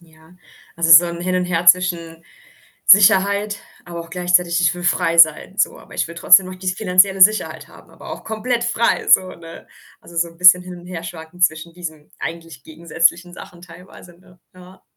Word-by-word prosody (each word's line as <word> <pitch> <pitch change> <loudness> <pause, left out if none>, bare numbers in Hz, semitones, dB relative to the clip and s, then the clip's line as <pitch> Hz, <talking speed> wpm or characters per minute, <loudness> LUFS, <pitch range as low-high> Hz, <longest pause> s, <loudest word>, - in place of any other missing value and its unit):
Ja. 160 0 -23 0.4
Also, 165 0 -1
so 165 +2 +8
'n 170 0 -8
Hin 185 +1 -3
und 180 - -2
Her 175 -1 -4
zwischen 170 -2 +1 0.6
Sicherheit, 200 +1 +3 0.2
aber 170 -1 -9
auch 165 0 -13
gleichzeitig: 180 -1 0
„Ich 175 - 0
will 175 - -10
frei 170 -1 -1
sein,“ 160 +4 +3
so. 210 - -2
„Aber - - -17
ich - - -3
will 170 - -11
trotzdem 180 +3 +4
noch 185 - -9
die 185 0 -6
finanzielle 190 0 +1
Sicherheit 215 +3 +1
haben, - - -19
aber - - -14
auch - - -11
komplett 235 +2 -4
frei“, 235 0 -2
so, 185 0 +3
ne? 165 -1 -14 0.3
Also, 170 - -17
so 170 +1 -1
'n 165 - -20
bisschen 180 0 +5
hin 180 -1 -11
und 175 - -17
herschwanken 170 -1 -10
zwischen 165 -1 -1
diesen 160 -4 -11
eigentlich 165 -4 -9
gegensätzlichen 170 +2 -2
Sachen 175 -1 -14
teilweise, 175 0 -17
ne? 180 0 -24 0.2
Ja. 185 +1 -18
175 Hz, 190 wpm, -18 LUFS, 165-185 Hz, 0.6 s, so